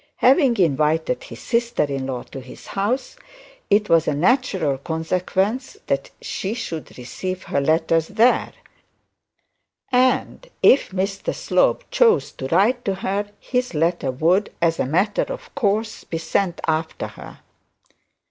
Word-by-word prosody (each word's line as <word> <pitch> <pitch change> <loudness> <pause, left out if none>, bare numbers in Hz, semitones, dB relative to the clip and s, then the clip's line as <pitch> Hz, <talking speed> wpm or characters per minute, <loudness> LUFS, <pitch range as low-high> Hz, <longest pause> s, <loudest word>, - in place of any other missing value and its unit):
Having 260 -2 +4
invited 160 - +1
his - - -10
sister 235 -5 0
in 135 -2 -3
law 125 -2 -4
to 135 - -9
his 130 - -13
house, 215 +7 -2 0.5
it 205 +1 +3
was 165 -1 +3
a 150 - +1
natural 185 - +1
consequence 185 - -1
of - - -25
that 140 0 -1
she 200 +4 -4
should 165 -10 -6
receive 185 +9 -5
her 140 - -1
letters 160 +2 +2
there. 235 +3 +3 1.4
And 255 - +1 0.2
if 275 - +6
Mr 195 +1 -2
Slope - - +1
chose 480 -2 +3
to 130 - -6
write 210 - +2
to 195 - 0
her, 200 +2 -2
his 250 -6 -2
letter 165 -2 +1
would, 170 +10 +1
as 165 -1 +1
a - - +1
matter 190 +8 +1
of - - -8
course, 220 -3 -1
be 165 - -4
sent 175 +2 -1
after 160 0 -1
her. - - -12
185 Hz, 140 wpm, -22 LUFS, 160-230 Hz, 1.4 s, if